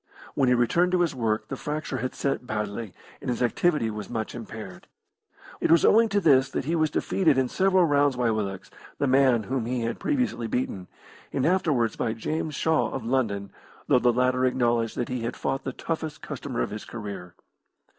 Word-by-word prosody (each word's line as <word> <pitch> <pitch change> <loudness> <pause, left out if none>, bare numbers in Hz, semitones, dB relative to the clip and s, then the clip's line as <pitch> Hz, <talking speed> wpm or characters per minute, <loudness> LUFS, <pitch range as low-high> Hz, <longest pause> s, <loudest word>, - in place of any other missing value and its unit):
When 135 -2 +2
he 125 - +5
returned 170 +10 +2
to 180 - +3
his 170 -3 +1
work 110 -4 -1
the 135 - -3
fracture 150 +3 -4
had 130 +3 -3
set 135 -2 -2
badly, 105 0 -3 0.3
and - - -4
his 125 0 0
activity 125 -1 +1
was 105 -1 -6
much 110 -3 -3
impaired. 110 -5 -9 0.7
It - - 0
was 165 0 +5
owing 225 +1 +5
to 205 0 +2
this 135 -7 +4
that 135 - -3
he 165 +4 0
was 155 -1 +2
defeated 155 -1 +1
in 130 -1 +2
seven 190 +6 +3
rounds 145 -4 +3
by 125 -2 +1
Willox, 100 -3 -3 0.3
the - - 0
man 130 -3 +4
whom 125 0 -2
he 125 0 -1
had 115 0 -3
previously 255 - -1
beaten, 105 -6 -3 0.4
and 135 - 0
afterwards 155 - +1
by 110 - -1
James 155 +6 -3
Shaw, 160 +1 +1
of 130 -4 -5
London, 110 -6 -1 0.3
though 125 - +4
the 125 0 +4
latter 125 +1 +1
acknowledged 120 -3 +1
that 120 - -1
he 125 -1 -3
had 115 - -4
found 135 - -1
the 135 - -2
toughest 160 +2 -5
customer - - -4
of - - -4
his 105 0 -6
career. 100 -6 -7
125 Hz, 195 wpm, -26 LUFS, 115-150 Hz, 0.7 s, he